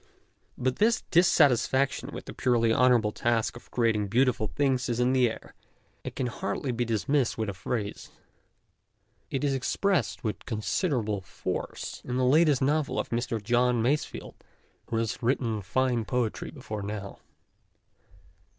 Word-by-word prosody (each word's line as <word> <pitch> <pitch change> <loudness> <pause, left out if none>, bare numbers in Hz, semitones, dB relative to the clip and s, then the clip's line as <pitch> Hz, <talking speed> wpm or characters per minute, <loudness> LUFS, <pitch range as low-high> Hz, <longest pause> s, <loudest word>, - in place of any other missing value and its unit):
But 130 0 -1
this 225 +2 +3
dissatisfaction 140 -5 +3
with - - -7
the - - -8
purely 115 -2 +2
honourable 120 -4 +4
task 115 +1 0
of 120 - -13
creating 110 -4 +1
beautiful 120 0 +2
things 130 -2 0
is 120 0 -1
in 125 +1 +3
the 125 -2 +4
air, 110 - -9 0.5
and - - -6
can 130 - -1
hardly 125 +2 -3
be 120 0 -1
dismissed 120 +4 0
with 110 -2 -1
a - - -3
phrase. 105 +2 -4 1.2
It 135 - -2
is 140 -1 +2
expressed 185 +8 0
with 110 -3 -4
con 110 -2 -3
siderable 110 - -1
force - - -5
in 125 0 -3
the 130 - +2
latest 150 0 +4
novel 150 +1 +1
of - - -2
Mr. 115 -1 -1
John 120 +2 +2
Masefield, 145 +5 -1 0.6
who 115 - -1
has 115 +3 -2
written 115 -3 0
fine 120 +4 0
poetry 120 -1 -2
before 130 -7 -6
now. 100 -1 -6
125 Hz, 150 wpm, -28 LUFS, 110-130 Hz, 1.2 s, honourable